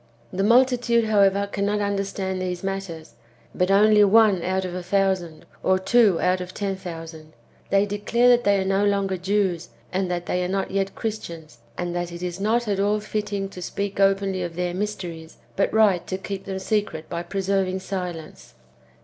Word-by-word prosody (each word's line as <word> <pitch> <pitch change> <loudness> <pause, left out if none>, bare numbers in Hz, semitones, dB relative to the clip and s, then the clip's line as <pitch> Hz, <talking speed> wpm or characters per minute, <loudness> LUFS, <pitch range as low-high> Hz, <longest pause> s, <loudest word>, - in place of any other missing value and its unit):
The 185 - -1
multitude^ 240 +1 +3
however, 200 -2 +3
cannot 200 +1 -1
understand 195 -2 -2
these 180 -1 -3
matters, 195 -5 -5 0.4
but 180 +1 0
only 210 +1 +6
one 205 -2 +5
out 190 +2 -1
of 180 - -5
a 180 - -4
thousand, 185 -3 -1 0.2
or 190 0 +3
two 200 -1 +3
out 180 0 +1
of 180 0 -8
ten 200 -1 -2
thousand. 165 -4 -9 0.4
They 200 +1 +3
declare 205 +4 +1
that 245 0 +5
they 200 -2 +3
are 190 - -1
no 195 +1 +1
longer 200 -2 +1
Jews, 185 -2 -1 0.2
and 185 0 0
that 175 -1 -2
they 180 0 -1
are - - -1
not 195 +1 -2
yet 195 0 -1
Christians; 170 - -6 0.2
and 175 0 -3
that 175 0 -3
it 170 +1 -7
is 180 0 -4
not 225 +3 +1
at 200 -2 0
all 205 +1 +2
fitting 205 -2 -3
to 185 - -10
speak 200 +3 -4
openly 195 -1 +2
of 175 -1 -4
tlieir 175 +1 -2
mysteries, 175 -5 -5 0.2
but 195 - +1
right 210 -5 +3
to 185 - -2
keep 195 0 -6
them 190 -1 -4
secret 190 -5 -2
by 170 - -4
preserving 190 +1 -1
silence. 180 -4 -6
195 Hz, 185 wpm, -24 LUFS, 180-205 Hz, 0.4 s, only